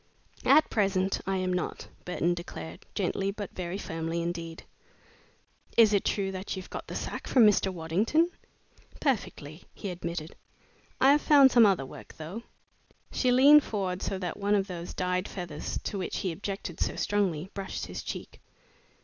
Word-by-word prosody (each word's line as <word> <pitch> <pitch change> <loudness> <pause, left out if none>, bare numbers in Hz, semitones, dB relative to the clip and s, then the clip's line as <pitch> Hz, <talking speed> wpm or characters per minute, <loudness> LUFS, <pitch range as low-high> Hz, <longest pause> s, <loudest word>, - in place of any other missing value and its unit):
"At 305 +3 +5
present 195 -2 +1
I 195 0 +1
am 185 0 0
not," 180 - -3 0.2
Burton 175 -1 0
declared, 170 0 -8
gently 195 0 0
but 205 0 -6
very 180 +1 -4
firmly 165 -3 -3
indeed. 170 -1 -5 1.1
"Is 220 -2 +7
it 200 - +3
true 195 -2 0
that 190 +1 -4
you've 190 -1 -8
got - - -6
the - - -6
sack - - -5
from 245 -4 +6
Mr. 200 -2 +4
Waddington?" 200 - +1 0.7
"Perfectly," 185 - -2
he 200 - -5
admitted. 170 -2 -5 0.6
"I 270 - +6
have 295 +1 +4
found 280 -3 +7
some 235 -3 +7
other 185 -9 +1
work, - - -12
though." 165 +8 -6 0.7
She 255 - +2
leaned 280 +4 +8
forward 190 -3 -2
so 195 - -2
that 180 -2 -4
one 205 +1 +2
of 195 -1 +2
those 175 -3 -7
dyed 180 +1 -1
feathers 170 -5 -5
to 200 - -3
which 185 - -3
he 185 - -1
objected 195 -1 -5
so - - 0
strongly 190 -4 0
brushed 195 -1 -4
his - - -6
cheek. - - -7
190 Hz, 165 wpm, -29 LUFS, 175-210 Hz, 1.1 s, leaned